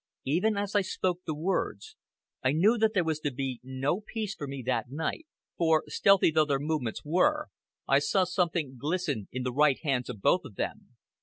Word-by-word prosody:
Even 190 +10 +1
as 200 0 -2
I 205 - +5
spoke 185 -2 -1
the 155 - -1
words, 155 - -2 0.5
I 130 +1 +2
knew 200 +9 +4
that 220 0 +2
there 185 - +3
was 160 -2 -1
to 150 - -1
be 130 -1 -4
no 130 - -2
peace 215 -1 -4
for 145 - -6
me 135 -1 -6
that 125 -2 -1
night, 160 - -3 0.3
for, 160 -2 +3
stealthy 195 -4 +4
though 155 0 +4
their 140 -2 +1
movements 145 -5 -3
were, 295 - +2 0.4
I 135 - +5
saw 165 +7 +2
something 170 -7 -1
glisten 150 - -1
in 130 0 -3
the 125 -1 -2
right 145 0 +4
hands 135 -5 0
of 105 - -6
both 180 - +3
of 125 -9 -11
them. - - -5
155 Hz, 200 wpm, -29 LUFS, 135-185 Hz, 0.5 s, I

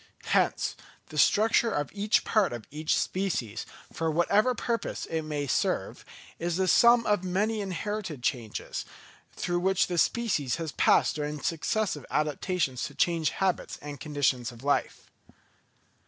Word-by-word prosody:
Hence, - - +1 0.3
the 155 - -8
structure 225 +7 +4
of 145 -8 -2
each 210 +2 +2
part 205 - +2
of 120 -3 -7
each 155 +2 0
species, 130 - -2 0.3
for 165 0 -1
whatever 200 +10 +2
purpose 230 0 -2
it 160 -1 -2
may 150 -2 -3
serve, 135 - -1 0.4
is 170 0 -1
the 190 0 +1
sum 235 +5 +6
of 205 -3 +1
many 205 +4 0
inherited 190 - -4
changes, 120 -7 -3 0.5
through 175 0 -1
which 190 +1 +2
the 175 -2 -1
species 185 - +1
has 165 -3 -4
passed - - +3
during 150 0 -3
its 145 - -3
successive 165 - -2
adaptations 150 -2 -1
to - - -8
changed 165 -3 +1
habits 190 -2 -1
and 145 -1 -8
conditions 140 -5 0
of 120 +1 -14
life. 145 0 -1
170 Hz, 145 wpm, -28 LUFS, 145-200 Hz, 0.5 s, sum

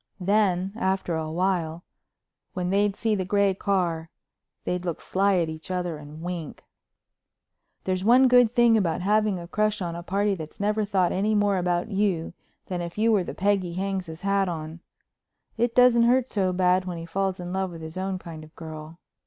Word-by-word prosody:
Then, 195 -1 +1
after 190 -4 -1
a 160 -1 -3
while, 170 -1 -1 0.7
when 180 0 -2
they'd 200 0 +2
see 225 0 0
the 195 -3 0
gray 200 +1 +2
car, 175 -5 -1 0.5
they'd 180 0 -2
look 170 -3 -3
sly 195 +1 +1
at 170 -2 +1
each 160 +1 -8
other 180 -3 -2
and 150 +2 -11
wink. 175 -3 -6 1.2
There's 185 0 -1
one 250 +5 +6
good 245 -2 +5
thing 240 -1 +5
about 180 -6 +1
having 210 0 +2
a 170 -1 -8
crush 215 +3 0
on 170 -3 -3
a 170 - -5
party 200 +3 0
that's 160 -4 -8
never 210 +1 +1
thought 190 -3 +1
any 210 +3 +1
more 205 -2 +2
about 180 +3 -1
you 195 -5 0 0.3
than 180 -2 -4
if 170 +2 -6
you 225 +2 +3
were 205 -4 +3
the - - -7
peg 200 +1 +2
he 175 -2 -6
hangs 190 -1 -2
his 160 +1 -9
hat 195 -1 +1
on—it 170 +8 -7
doesn't 250 -1 +6
hurt 245 +2 +3
so 190 -3 +1
bad 180 0 +2
when 180 -2 -4
he 165 - -6
falls 190 +2 -2
in 180 0 -5
love 190 0 -1
with 165 -2 -9
his 160 0 -8
own 190 0 -2
kind 165 -3 -9
of 155 +1 -16
girl. 160 0 -9
185 Hz, 195 wpm, -25 LUFS, 170-205 Hz, 1.2 s, one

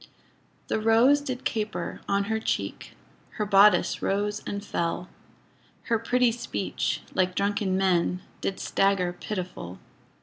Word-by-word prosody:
The - - 0
rose 230 +6 +5
did 255 -3 -5
caper 215 -1 -3
on 200 0 +2
her 220 +2 -1
cheek, - - -3 0.4
Her 210 - -2
bodice 200 +1 +5
rose 205 +1 -1
and 200 0 -4
fell, 170 0 -2 0.7
Her 230 -2 +1
pretty 245 +1 +2
speech, 235 +1 -3
like 185 -1 +1
drunken 200 -1 0
men, 180 -1 +1 0.2
Did 195 - -2
stagger 195 -3 +1
pitiful. 180 - -6
200 Hz, 125 wpm, -26 LUFS, 185-225 Hz, 0.7 s, rose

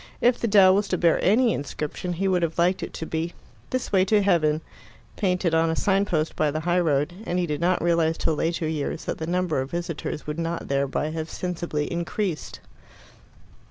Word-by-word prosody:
If 245 0 +3
the 235 - 0
dell 195 -3 +7
was 200 +1 +1
to 185 - 0
bear 170 -1 +3
any 230 +4 +4
inscription, 150 +5 -4
he 190 +3 -1
would 185 -2 +2
have 165 -1 -1
liked 180 +2 +2
it - - -5
to 160 - -4
be 165 +2 -3 0.4
"This 255 -1 -2
way 190 -2 +4
to 205 +1 +3
Heaven," 160 -5 +2 0.5
painted 180 -3 0
on 165 0 +3
a 160 - 0
sign 195 +2 +2
post 160 -5 -1
by 155 - +2
the 155 +2 -2
high 175 +2 +1
road, 150 -1 +1
and 180 -5 -2
he 180 - +1
did 150 -1 -3
not 180 0 +2
realize 165 -1 +2
till 160 - 0
later 165 +1 -1
years 155 0 -3
that - - -3
the 160 - -4
number 175 -5 0
of 135 - -5
visitors 170 -3 -4
would 150 +2 -4
not 165 0 -3
thereby 140 +2 0
have 160 0 -4
sensibly 170 -4 -3
increased. 170 0 -3
170 Hz, 205 wpm, -25 LUFS, 155-185 Hz, 0.5 s, dell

